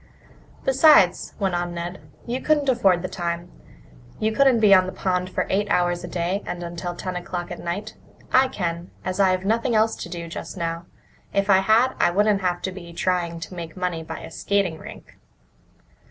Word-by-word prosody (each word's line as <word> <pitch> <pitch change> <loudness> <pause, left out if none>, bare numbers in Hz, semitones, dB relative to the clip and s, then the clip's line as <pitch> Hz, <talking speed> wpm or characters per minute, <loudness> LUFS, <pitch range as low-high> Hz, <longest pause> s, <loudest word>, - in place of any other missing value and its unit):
"Besides," 265 - +5
went 195 -2 0
on 175 0 -2
Ned, 175 +2 -5 0.2
"you 245 +2 -3
couldn't 300 -2 +2
afford 190 -8 +3
the - - -1
time. 175 -1 -4 0.7
You 215 +1 0
couldn't 265 0 +4
be 210 -2 +6
on 185 -1 +5
the - - -4
pond 180 -1 -1
for - - -1
eight 205 +2 0
hours 175 0 +1
a - - -5
day 175 +3 -2
and 175 0 -4
until 175 +1 -5
ten 185 0 -5
o'clock 175 0 -5
at - - -6
night. 200 +6 -4 0.4
I 260 +1 +6
can, 175 -8 -4 0.2
as 185 +1 -3
I've 185 -1 +3
nothing 230 +2 +1
else 220 +1 +3
to - - -7
do 170 -2 -6
just 165 - -7
now. 165 0 -3 0.5
If 200 0 +2
I 190 - +6
had, 220 +6 +3
I - - +4
wouldn't 205 +2 +2
have 180 -1 -1
to 190 - -2
be 180 -2 -10
trying 170 -1 -1
to 170 +2 -7
make 170 -1 -7
money 180 -3 -2
by 160 - -7
a - - -9
skating 195 -5 0
rink." - - -12
185 Hz, 195 wpm, -23 LUFS, 175-205 Hz, 0.7 s, be